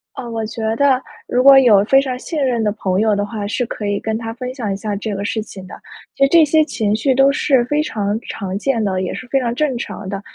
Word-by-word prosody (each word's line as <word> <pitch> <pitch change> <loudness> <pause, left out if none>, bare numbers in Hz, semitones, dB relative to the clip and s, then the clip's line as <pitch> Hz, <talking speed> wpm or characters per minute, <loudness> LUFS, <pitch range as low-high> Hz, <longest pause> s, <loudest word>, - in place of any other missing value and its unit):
呃， 245 -3 -7
我 225 -1 -3
觉 225 0 -7
得 270 0 +2 0.3
如 250 +1 +1
果 275 0 +8
有 210 -6 +5
非 270 +4 +4
常 255 -2 -4
信 300 +2 -3
任 240 -3 0
的 210 - +1
朋 190 -2 -1
友 215 -1 +2
的 205 0 -1
话， 210 -1 -5
是 245 +3 -1
可 215 -2 -6
以 205 0 -1
跟 220 0 -2
他 225 0 -5
分 250 +1 -6
享 230 -7 -4
一 - - -3
下 205 +1 -4
这 205 +1 -4
个 200 - -4
事 220 +1 -2
情 195 -3 -10
的。 - - -10 0.4
其 275 - +1
实 275 - +4
这 330 +1 +6
些 310 +1 +3
情 215 -8 -1
绪 265 +5 +1
都 270 +1 +5
是 270 -3 +2
非 295 +4 0
常 210 -4 -2
常 195 -2 -5
见 235 -1 -1
的， 190 -2 -1
也 185 - -3
是 255 - -8
非 270 +2 +1
常 240 -2 -2
正 265 -1 -1
常 205 -4 -6
的。 195 0 -4
230 Hz, 290 characters per minute, -18 LUFS, 205-265 Hz, 0.4 s, 果